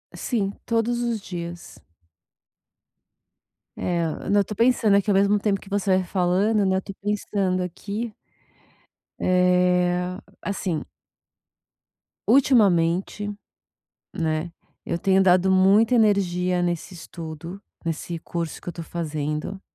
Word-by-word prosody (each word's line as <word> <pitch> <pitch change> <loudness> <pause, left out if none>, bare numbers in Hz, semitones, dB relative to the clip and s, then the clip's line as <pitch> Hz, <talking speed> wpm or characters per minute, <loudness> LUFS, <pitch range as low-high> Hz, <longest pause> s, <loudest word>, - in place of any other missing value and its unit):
Sim, 205 -6 -1
todos 235 +1 0
os 235 -2 -1
dias. 175 -2 -7 2.0
Eh, 170 -3 -2
não, 205 0 +4
eu - - +1
tô 210 - -6
pensando 230 -3 +3
aqui 200 +1 0
ao 195 - +3
mesmo 200 +1 +3
tempo 200 -2 0
que 195 - -14
você 195 -2 +2
vai 185 - 0
falando, 195 +4 +1
né. 190 0 +2
Eu - - -1
tô 195 - -8
pensando 200 -2 -1
aqui 205 +5 -5 1.0
eh, 180 0 +2 0.2
assim 185 -6 -2 1.4
ultimamente, 205 -6 +3 0.8
né, 160 -1 -2 0.3
eu 170 - -1
tenho 190 +1 +3
dado 185 0 +4
muita 200 +6 +5
energia 185 -5 +2
nesse 175 +1 -2
estudo, 165 +2 -8 0.2
nesse 165 +1 -3
curso 165 -1 -5
que - - -9
eu - - -3
tô 165 - -7
fazendo. 155 +2 -4
185 Hz, 120 wpm, -24 LUFS, 175-205 Hz, 2.0 s, muita